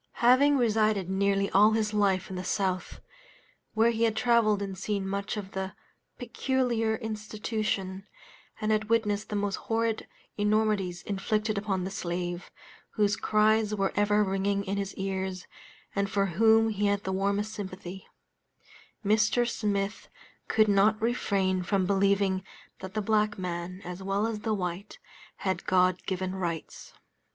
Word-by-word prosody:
Having 275 +4 +6
resided 215 -5 +2
nearly 200 0 +2
all 210 +3 +6
his 215 -1 0
life 195 -3 +1
in - - -4
the 180 - -4
South, 185 -1 -2 0.7
where 225 +2 +4
he 225 -1 -3
had 220 -1 +1
traveled 230 -3 +3
and 195 -1 -4
seen 195 0 -2
much 200 +2 -3
of 195 -2 -6
the 190 0 -4 0.4
"peculiar 245 -2 0
institution," 215 -3 -3 0.5
and 215 0 0
had 215 0 0
witnessed 210 -2 +1
the 210 - -3
most 205 -1 -1
horrid 225 0 -1 0.3
enormities 210 -4 +1
inflicted 210 +2 -1
upon 200 -2 -1
the 190 - -4
slave, 175 -1 -4 0.5
whose 205 -2 +2
cries 215 0 +2
were 195 -1 0
ever 205 0 +3
ringing 200 +1 0
in 200 +1 -2
his 195 -1 -3
ears, 190 -1 -3 0.5
and 200 0 0
for 200 0 +1
whom 220 +5 +4
he 205 -1 0
had 200 0 0
the 190 - -2
warmest 200 +2 0
sympathy, 190 -2 -7 1.0
Mr. 215 +3 +3
Smith 205 -2 -2 0.4
could 215 -1 +3
not 205 +2 +4
refrain 195 -5 0
from 190 +1 0
believing 195 -1 +2 0.4
that 190 +1 -8
the 215 - 0
black 210 0 +1
man, 180 +1 -5
as 180 +1 -6
well 195 +2 0
as 225 -2 -2
the 215 0 -1
white, 180 - -4 0.4
had 190 -1 -3
God 185 0 +3
given 185 -1 -2
rights. 170 -4 -5
200 Hz, 145 wpm, -28 LUFS, 190-215 Hz, 1.0 s, Having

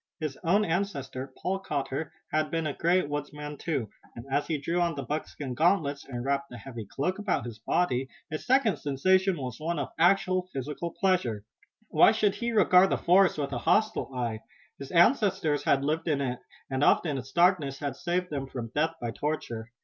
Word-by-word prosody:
His 155 -4 -3
own 200 +5 +3
ancestor, 140 -7 -3
Paul 190 +1 -1
Cotter, 145 -3 -3 0.2
had 155 0 +1
been 165 -1 -1
a 150 - -1
great 175 +1 +2
woodsman 145 0 -5
too, 140 -7 -2 0.3
and, 115 - -8
as 145 - +1
he 160 - 0
drew 170 +5 -1
on 170 -2 +1
the 140 - -4
buckskin 145 -1 -4
gauntlets 155 -2 +1
and 120 -2 -5
wrapped 140 0 -1
the 125 - -9
heavy 115 -3 -8
cloak 180 - -2
about 195 - -1
his 115 -3 -8
body, 130 +1 0 0.2
his 155 - -4
second 250 -5 +3
sensation 185 +6 +2
was 125 -5 -5
one 165 +2 -2
of 140 - -2
actual 185 +1 +3
physical 145 +5 -4
pleasure. 150 - +1 0.5
Why - - +6
should 215 -2 +2
he 235 0 -2
regard 190 -4 +5
the - - +1
forest 185 0 +4
with 140 -2 -2
a 120 - -2
hostile 215 - +1
eye? 115 -3 -2 0.4
His 140 - -7
ancestors 175 - +3
had 135 0 +3
lived 155 +3 -1
in 150 -3 +1
it 125 -3 -2 0.3
and 135 +1 -1
often 145 -4 +3
its 130 +1 -10
darkness 170 -6 +3
had 140 -3 -4
saved 180 +3 -2
them 140 -2 -3
from 120 -4 -6
death 160 +2 +1
by 120 -1 -3
torture. 120 -5 -4
150 Hz, 190 wpm, -28 LUFS, 135-180 Hz, 0.5 s, Why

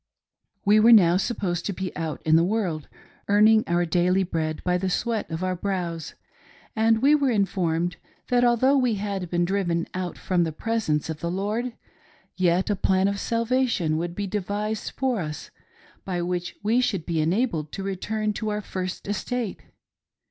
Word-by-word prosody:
We 210 +1 +6
were 225 +2 +6
now 180 -6 +7
supposed 185 -5 -2
to 200 - -2
be 190 0 -5
out 160 -2 -4
in 160 0 +4
the 165 - +5
world, 180 -6 -1 0.4
earning 215 +2 +5
our 175 +1 +1
daily 180 +3 +2
bread 160 -3 -3
by 180 0 +1
the 190 +1 -1
sweat 225 +3 -1
of 160 +2 -4
our 185 0 0
brows, 175 -4 -3 0.6
and 225 +1 +3
we 285 +2 +6
were 285 -3 +3
informed 175 -6 0 0.3
that 245 -1 +3
although 245 +3 +4
we 250 -5 +2
had 195 -3 -3
been 175 0 +1
driven 175 -3 0
out 185 -1 -4
from 180 -2 +1
the 160 - -1
presence 160 -4 -1
of 160 -1 -5
the 170 - -3
Lord, 210 +7 -2 0.6
yet 185 +2 +2
a - - +1
plan 190 +1 +2
of 200 0 -1
salvation 230 -8 0
would 170 +1 -3
be 205 - -2
devised 210 +2 -3
for 255 -4 -1
us, 150 -3 -6 0.5
by 180 -2 -3
which 180 0 -3
we 225 +4 +3
should 195 -10 -1
be 165 -2 0
enabled 165 - 0
to 195 - -4
return 210 +3 -2
to 215 +1 -3
our 210 0 -2
first 185 -2 -5
estate. 220 +2 -3
190 Hz, 175 wpm, -25 LUFS, 175-220 Hz, 0.6 s, now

